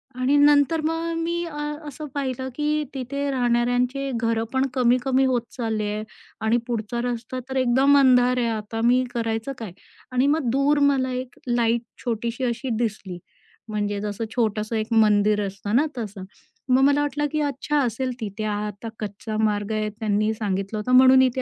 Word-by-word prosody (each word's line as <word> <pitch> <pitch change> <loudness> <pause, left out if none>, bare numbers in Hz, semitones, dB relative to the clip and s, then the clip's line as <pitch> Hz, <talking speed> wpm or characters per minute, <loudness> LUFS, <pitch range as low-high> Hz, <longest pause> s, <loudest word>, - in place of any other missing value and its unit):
आणि 255 +3 +1
नंतर 290 +2 +4
मग 325 +1 -1
मी 340 +1 -1
अ, 305 -3 -7 0.3
असं 295 +2 -7
पाहिलं, 260 -2 -3
की 300 0 0
तिथे 280 +2 -3
राहणाऱ्यांचे 245 +2 +1
घरं 230 0 0
पण 265 +1 +2
कमी-कमी 255 +1 +2
होत 255 -2 +1 0.2
चालले 220 -3 -1
आहे 215 0 -3 0.4
आणि 230 +2 +3
पुढचा 235 0 -2
रस्ता 245 +1 -3
तर 265 - -4
एकदम 265 +3 +4
अंधार 250 -2 +5
आहे. 240 - +1
आता 220 0 -4
मी 250 +2 +4
करायचं 225 +1 -2
काय 220 -7 -7 0.4
आणि 255 +2 +2
मग 290 -4 +1
दूर 280 +2 +2
मला 260 -2 0
एक 250 0 -5
लाईट 235 -1 +2 0.2
छोटीशी 235 +2 -2
अशी 245 +2 -2
दिसली. 205 -6 -3 0.5
म्हणजे 205 -1 -2
जसं 210 +1 -3
छोटंसं 220 -1 0
एक 215 0 -1
मंदिर 210 -1 +4
असतं 200 +2 -3
ना 285 +5 +4
तसं. 205 -4 -5 0.5
मग 260 +1 +5
मला 285 +1 +4
वाटलं, 290 0 -1
की 305 - -1
"अच्छा, 290 +1 -1
असेल 255 +1 -1
तिथे, 215 -1 -5
हा 210 -1 -1
आता 210 +2 -7
कच्चा 215 +1 -5
मार्ग 210 -1 0
आहे, 215 0 -1
त्यांनी 215 0 0
सांगितलं 200 -1 -3
होतं 230 +4 -3
म्हणून 260 0 +7
इथे 260 0 +2
245 Hz, 170 wpm, -24 LUFS, 215-265 Hz, 0.5 s, म्हणून